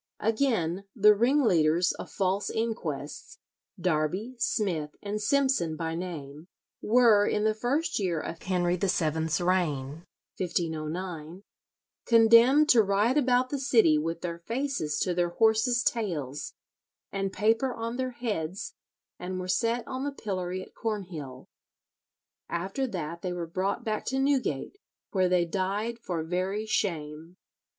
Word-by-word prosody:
Again, 215 -6 0
the 210 -1 +7
ringleaders 185 - +3
of - - -8
false 195 +1 -1
inquests, 165 -11 -4 0.4
Darby, 180 +8 -1
Smith, 175 -11 -1
and 210 +1 -3
Simson 265 - +1
by 160 0 -3
name, 160 -3 -6 0.3
were, 220 -3 +5
in 210 - 0
the 215 0 +3
first 280 +9 -1
year 180 -5 0
of 165 - -6
Henry 180 -1 +1
VII's 160 -4 0
reign 165 -5 0 0.4
(1509), 165 0 -3 0.6
condemned 230 +6 +6
to 240 -6 +7
ride 205 +5 +2
about 255 -3 +2
the 285 - -1
city 225 - +4
with 165 +2 -3
their 170 -1 -4
faces 230 - -2
to 180 - +1
their 175 0 +1
horses' 225 +5 +2
tails, 150 - -2 0.6
and 195 -1 -2
paper 225 +6 +1
on 230 0 -4
their 260 0 -1
heads, 210 - -4 0.5
and 185 +1 -4
were 185 - -5
set 230 +5 0
on 260 +1 -4
the 285 - -2
pillory 185 -7 -4
at - - -16
Cornhill. 175 - -5 1.0
After 195 +10 -2
that 170 -5 -5
they 180 -1 -3
were 175 -1 -3
brought 190 +7 -2
back 215 -2 -2
to 265 - -1
Newgate, 270 - 0 0.3
where 185 -2 +2
they 180 -1 +3
died 200 +6 -2
for 175 -7 -3
very 185 +5 -2
shame. 165 -4 -3
190 Hz, 135 wpm, -28 LUFS, 170-230 Hz, 1.0 s, the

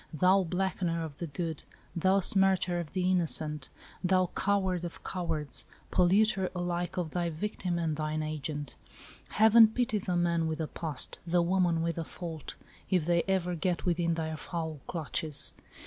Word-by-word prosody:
Thou 185 +5 +4
blackener 180 -2 -1
of 145 -3 -9
the 170 - -3
good, 160 +1 -4 0.3
thou 190 +3 +3
smircher 190 -2 +3
of 155 - -9
the 185 0 +1
innocent, 155 -5 +1 0.3
thou 185 0 +2
coward 190 -3 +1
of 175 - -6
cowards, 160 -5 -2 0.2
polluter 190 +1 +3
alike 175 0 -2
of 170 -4 -2
thy 175 -1 -1
victim 175 +1 -3
and 165 -2 -1
thine 155 0 -2
agent, 150 -2 -4 0.5
Heaven 220 +1 +7
pity 220 -1 0
the 180 -2 -1
man 170 -1 +1
with 160 0 -3
a 160 - -1
past, 155 -2 -3
the 175 +1 +3
woman 175 -2 +2
with 170 0 -1
a - - -1
fault, 160 -3 -7 0.3
if 180 -5 +2
they 170 0 +3
ever 185 -2 +1
get 175 +1 -1
within 170 -1 +1
thy 160 -1 -3
foul 160 -2 -4
clutches 160 -2 -1
175 Hz, 160 wpm, -30 LUFS, 160-185 Hz, 0.5 s, Heaven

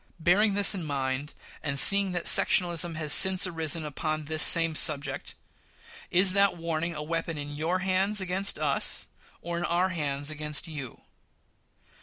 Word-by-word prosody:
Bearing 195 +5 0
this 205 0 +3
in 185 -4 -7
mind, 140 0 -6 0.3
and 140 -3 -3
seeing 200 +5 +7
that 175 -1 -5
sectionalism 175 -2 +3
has 155 -2 +1
since 190 0 +5
arisen 165 -2 -4
upon 155 +1 -6
this 155 +1 -2
same 165 -1 +4
subject, 150 -2 -2 0.7
is 185 +1 +3
that 200 -2 0
warning 165 0 -5
a 150 - -7
weapon 165 0 -6
in 145 0 -8
your 165 +5 -3
hands 195 +2 0
against 190 +1 -1
us, - - -1 0.4
or 170 0 -6
in - - -6
our 175 +2 -2
hands 145 -4 -4
against 150 +1 -5
you? 145 -7 -10
165 Hz, 155 wpm, -25 LUFS, 150-185 Hz, 0.7 s, seeing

